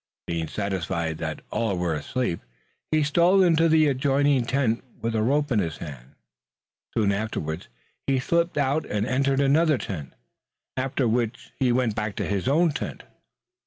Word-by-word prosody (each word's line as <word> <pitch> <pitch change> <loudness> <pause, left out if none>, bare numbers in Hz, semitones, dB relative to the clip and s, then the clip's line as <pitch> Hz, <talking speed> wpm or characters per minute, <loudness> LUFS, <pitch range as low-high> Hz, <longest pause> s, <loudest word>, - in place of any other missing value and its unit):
Being 85 -1 -2
satisfied 85 -4 -2
that 80 -2 -4
all 105 -4 0
were 85 -2 0
asleep, 85 - -2 0.5
he 155 -1 +3
stole 175 +6 +4
into 165 -2 +4
the 155 -1 +5
adjoining 140 -1 +2
tent 125 -3 0 0.2
with 115 0 -2
a 110 - +1
rope 145 +5 +1
in 115 - +3
his 80 -6 -2
hand. 70 -6 -9 0.8
Soon 105 -3 +3
afterwards 100 -6 -3 0.4
he 135 -1 +3
slipped 170 +6 0
out 145 +2 +1
and 105 0 -1
entered 135 +2 +1
another 150 +2 +4
tent, 75 - -6 0.6
after 130 -1 0
which 115 0 -1
he 130 -3 +3
went 120 -2 +1
back 105 -1 -3
to - - -2
his 100 +2 -1
own 160 +4 +4
tent. 145 - -5
125 Hz, 160 wpm, -25 LUFS, 100-145 Hz, 0.8 s, the